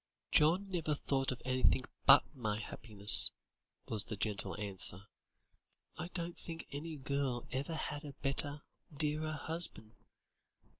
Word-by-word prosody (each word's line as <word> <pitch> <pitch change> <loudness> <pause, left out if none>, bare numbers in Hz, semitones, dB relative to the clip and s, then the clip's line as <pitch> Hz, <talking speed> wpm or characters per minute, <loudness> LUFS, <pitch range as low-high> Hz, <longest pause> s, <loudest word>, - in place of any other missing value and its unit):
"John 175 +6 +4
never 160 -4 -1
thought 135 -2 0
of 130 - -7
anything 130 0 +2 0.2
but - - +9
my 110 -5 -2
happiness," 105 -1 +4 0.6
was 110 -2 -1
the 110 - -5
gentle 105 0 -1
answer. 95 -2 -3 0.9
"I 160 - -5
don't 175 -1 -5
think 165 -1 -7
any 155 +3 -5
girl 140 -3 -2
ever 140 +5 -3
had 150 -1 -4
a 145 -2 -8
better, 145 +2 0 0.3
dearer 155 +1 -1
husband. 150 -8 0
140 Hz, 130 wpm, -35 LUFS, 115-155 Hz, 0.9 s, but